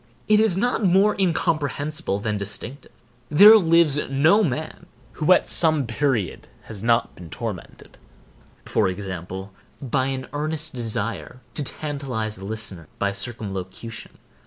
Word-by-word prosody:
It 215 0 +5
is 215 -5 +2
not 245 +2 0
more 195 +3 +4
incomprehensible 155 - -1
than 105 +1 -2
distinctive. 105 +7 -6 0.4
There 205 +9 +9
lives 165 -6 +4
no 155 +10 +4
man 155 -1 -4 0.2
who 155 +3 0
at 185 - +5
some 155 -4 +2
period 115 - -1 0.2
has 105 -3 -9
not 115 +1 +1
been 85 -2 -12
tormented, - - -7 0.7
for 105 - +1
example, 95 0 -6 0.3
by 130 0 -1
an 130 -1 -3
earnest 155 +1 -3
desire 115 +1 -4
to 150 - -3
tantalize 130 -8 -4
a 95 - -8
listener 100 -6 -5
by 100 - 0
circumlocution. 105 0 -7
130 Hz, 130 wpm, -23 LUFS, 105-160 Hz, 0.7 s, There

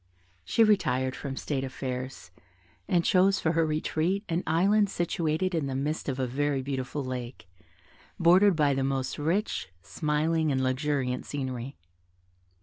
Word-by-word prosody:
She 225 - +3
retired 130 - +2
from 135 -2 -6
state 135 -3 -2
affairs, 130 -5 -5 0.6
and 170 -2 +2
chose 190 +1 +4
for 160 - +1
her 165 0 +2
retreat 160 +5 0
an 170 +1 0
island 200 +6 +3
situated 175 0 -1
in 160 -4 0
the 135 - -3
midst 145 +3 -2
of 130 - -2
a 130 - +1
very 135 +2 -1
beautiful 135 +1 -3
lake, 125 -4 -6 0.7
bordered 185 +3 +6
by 145 -3 +3
the 135 0 0
most 135 0 -2
rich, 165 - -1
smiling, 155 +1 0
and 130 -1 0
luxuriant 130 -1 -1
scenery. 130 -2 -4
145 Hz, 145 wpm, -28 LUFS, 130-170 Hz, 0.7 s, bordered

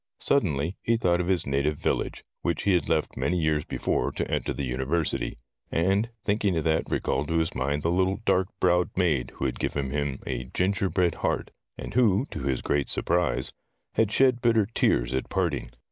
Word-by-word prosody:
Suddenly 85 - +1
he 115 0 +2
thought 90 -5 +2
of 90 - -3
his 95 -2 +1
native 70 +2 0
village, - - -2 0.2
which 85 -1 -1
he 100 - +3
had 90 - +1
left 80 -2 0
many 90 - 0
years 80 -3 +1
before - - -1
to - - -2
enter - - -1
the 70 - -3
university. 65 0 -1 0.3
And 95 +7 +2
thinking 100 -3 +1
of 80 - 0
that 80 0 +1
recalled 70 +2 -1
to 80 - 0
his 80 -1 0
mind 70 +3 -1
the 85 - +1
little 95 +2 +1
dark 95 -3 +3
browed 90 -1 +3
maid 80 -9 +1
who - - -3
had - - -2
given 70 -2 -2
him 70 -1 -1
a 65 - -3
ginger 95 +2 +1
bread 90 -4 +2
heart, - - -1 0.3
and - - -7
who, 115 -1 +3
to - - -5
his 65 -2 -1
great 70 -1 0
surprise, 85 -7 +1 0.4
had 110 -2 +2
shed 125 +1 +3
bitter 115 -3 +3
tears 60 - +1
at 65 - -2
parting. 85 -9 -1
85 Hz, 190 wpm, -27 LUFS, 70-95 Hz, 0.4 s, he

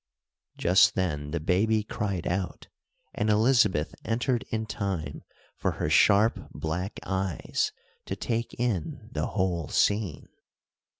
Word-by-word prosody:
Just 90 +3 +5
then 75 -7 -1
the 85 - -2
baby 105 +7 +2
cried 100 -4 -3
out, 90 +1 -2 0.5
and 105 - 0
Elizabeth 105 - +3
entered 120 +2 0
in 110 0 -2
time 95 -9 -3 0.4
for - - 0
her - - -2
sharp, 105 +2 +4
black 90 +6 -3
eyes 95 -2 -1 0.4
to - - -2
take 115 0 -2
in 115 -10 -2
the - - -1
whole 85 -5 -1
scene. 100 -7 +1
100 Hz, 120 wpm, -28 LUFS, 85-110 Hz, 0.5 s, Just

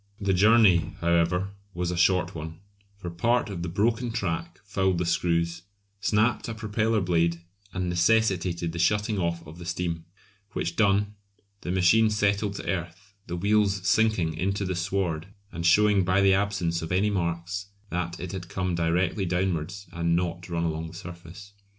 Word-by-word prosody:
The 100 -2 +1
journey, 105 -2 +4
however, 85 +3 +1 0.2
was 90 0 -1
a - - -2
short 90 0 +2
one, 80 0 -7 0.4
for 90 -3 -6
part 115 +6 +1
of 90 -3 -5
the 85 - -3
broken 115 +7 0
track 100 -7 -3
fouled 95 -2 0
the 90 - -1
screws, 85 0 0 0.4
snapped 110 +5 +1
a 115 - -4
propeller 110 0 0
blade 85 -1 +1 0.3
and 90 -1 -2
necessitated 90 -2 +1
the 85 - -6
shutting 105 +4 +1
off 85 -1 -2
of 80 +3 -11
the 85 - -8
steam, 85 -1 -3 0.5
which 85 0 -2
done, 105 0 +2 0.5
the - - -6
machine 95 +5 +4
settled 100 -1 0
to - - -7
earth, 95 +3 -4
the 85 - -4
wheels 100 0 +1
sinking 110 -7 +2
into 100 +5 -1
the 95 - -1
sward 90 -2 -2 0.2
and 85 0 -1
showing 105 +2 +5
by 90 +2 +2
the 100 -1 +5
absence 95 -4 0
of 80 - -5
any 100 +3 +2
marks 90 +1 -2 0.2
that 85 -1 -3
it 90 -1 -5
had 90 -3 -6
come 90 -1 -2
directly 90 +4 0
downwards 90 +1 -2
and 85 0 +1
not 85 0 -2
run 85 -1 -1
along 80 0 -2
the 80 - -11
surface. 90 +2 -10
90 Hz, 170 wpm, -26 LUFS, 85-100 Hz, 0.5 s, showing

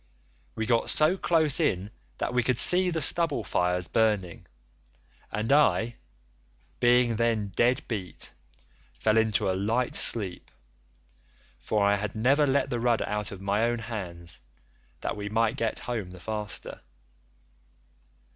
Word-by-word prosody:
We 110 - -2
got 115 0 +1
so 155 +4 +4
close 160 -6 +2
in 95 +4 -1 0.3
that - - -3
we 125 - +2
could 125 0 0
see 180 +5 +4
the 165 -2 -2
stubble 150 -4 +4
fires 90 -2 -1
burning, 105 -6 -1 0.8
and 110 +4 -2
I, 120 -5 +2 0.8
being 120 -1 +3
then 115 -3 0
dead 120 +7 +1
beat, 100 -6 -4 0.6
fell 110 - +1
into 110 -3 +1
a 95 - +1
light 110 +6 -1
sleep, 100 -6 +2 1.1
for 105 -2 0
I 100 0 +3
had 105 +1 -5
never 135 +7 +2
let 140 0 0
the 120 - -1
rudder 120 -1 +1
out 105 -1 -3
of 95 -1 -9
my 100 +3 0
own 120 0 0
hands, 90 -7 -7 0.6
that - - -3
we 105 0 -5
might 110 +1 +1
get 115 -1 -2
home 110 -7 -4
the 90 0 -12
faster. 105 +2 -6
110 Hz, 140 wpm, -27 LUFS, 100-125 Hz, 1.1 s, so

